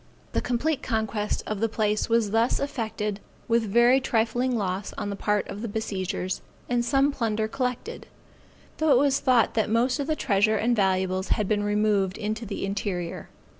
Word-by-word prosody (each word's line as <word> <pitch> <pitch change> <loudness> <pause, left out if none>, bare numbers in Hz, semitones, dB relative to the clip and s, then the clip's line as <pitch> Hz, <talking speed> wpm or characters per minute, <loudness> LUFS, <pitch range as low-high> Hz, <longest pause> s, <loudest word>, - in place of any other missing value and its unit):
The - - +1
complete 265 +5 0
conquest 220 -1 -1
of 215 -2 -3
the 225 +1 +1
place 215 0 0
was 230 -3 +2
thus 225 +2 +2
effected 220 -7 -3 0.3
with 230 0 +3
very 240 +5 +5
trifling 240 +1 +1
loss 195 -1 -3
on 205 - -4
the - - -3
part 210 0 0
of 200 +1 -7
the 235 - -3
besiegers, 190 -4 -3 0.3
and 245 -1 +1
some 275 +3 +3
plunder 220 -5 -1
collected; 255 - -4 0.7
though 315 0 +2
it 270 - +6
was 275 +1 +3
thought 250 -4 +3
that 220 -1 +1
most 245 +5 +2
of 285 - -2
the 310 - +1
treasure 215 -4 +2
and 235 +3 +2
valuables 190 -2 +1
had 210 - 0
been 210 0 +1
removed 205 -2 +1
into 215 +2 -3
the 200 - -3
interior. 195 -3 -3
220 Hz, 175 wpm, -26 LUFS, 205-245 Hz, 0.7 s, it